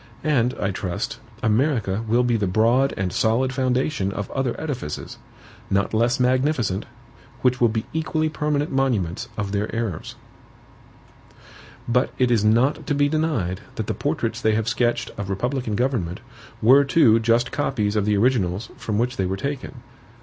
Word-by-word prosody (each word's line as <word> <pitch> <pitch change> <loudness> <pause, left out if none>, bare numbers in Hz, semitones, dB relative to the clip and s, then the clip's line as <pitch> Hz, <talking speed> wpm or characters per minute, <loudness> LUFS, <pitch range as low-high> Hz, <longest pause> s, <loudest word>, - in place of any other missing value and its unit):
And, 130 -5 +2
I 100 - -1
trust, 90 -2 -4 0.2
America 110 -3 +1
will 120 +3 +3
be 120 -1 +1
the 105 -3 0
broad 115 +8 +3
and 95 -2 -2
solid 125 +4 +1
foundation 130 -4 0
of 100 0 -5
other 135 -3 -2
edifices, 130 - -5 0.5
not 100 +2 +1
less 120 +4 +2
magnificent, 125 -5 +1 0.6
which 125 -1 +2
will 120 - +5
be 110 0 -2
equally 155 0 0
permanent 150 -1 -1
monuments 120 -6 0
of 100 -2 -2
their 105 +1 -1
errors. 110 -8 -3 1.7
But 125 +3 +2
it 125 -2 +2
is 110 -3 +3
not 120 +7 +2
to 145 - +1
be 145 0 +3
denied 145 - -1
that - - -3
the - - -2
portraits - - -2
they 110 -1 +2
have 110 0 -1
sketched 120 -1 0
of 100 -1 -4
republican 120 +3 -2
government 110 -8 -1 0.4
were 135 +5 +7
too 135 -5 +4
just 115 +1 +2
copies 110 -8 -1
of 105 -2 +1
the 105 -1 +2
originals 105 -4 +1
from 105 -2 -3
which 125 +3 0
they 95 - 0
were 95 +1 -2
taken. 140 +5 -5
120 Hz, 160 wpm, -23 LUFS, 105-135 Hz, 1.7 s, were